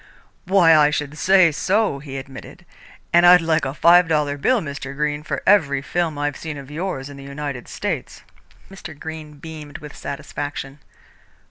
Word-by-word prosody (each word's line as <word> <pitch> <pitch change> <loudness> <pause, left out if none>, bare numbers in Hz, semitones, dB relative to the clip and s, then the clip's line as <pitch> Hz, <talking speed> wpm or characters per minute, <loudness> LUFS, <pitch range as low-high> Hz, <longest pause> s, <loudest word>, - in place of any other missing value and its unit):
"Why, 180 -3 +5
I 150 -1 +5
should 150 -1 -3
say 185 0 +4
so," 190 0 0
he 135 -1 -8
admitted, 135 0 -10 0.5
"and 175 +1 +6
I'd 180 0 +8
like 165 -1 0
a 135 - -3
five 175 +2 +5
dollar 150 -3 0
bill, 240 - +2
Mr. 140 -5 -6
Greene, 150 0 -1
for 155 - -4
every 140 -9 +3
film 165 -2 -2
I've 145 -1 -2
seen 155 -2 -6
of 140 0 -10
yours 155 -4 -4
in 140 -1 -11
the 140 - -10
United 140 -2 -6
States." - - -5 0.5
Mr. 175 -6 -10
Greene 160 -1 -8
beamed 150 -1 -9
with 150 -1 -11
satisfaction. 145 -1 -6
150 Hz, 165 wpm, -21 LUFS, 140-165 Hz, 0.5 s, I'd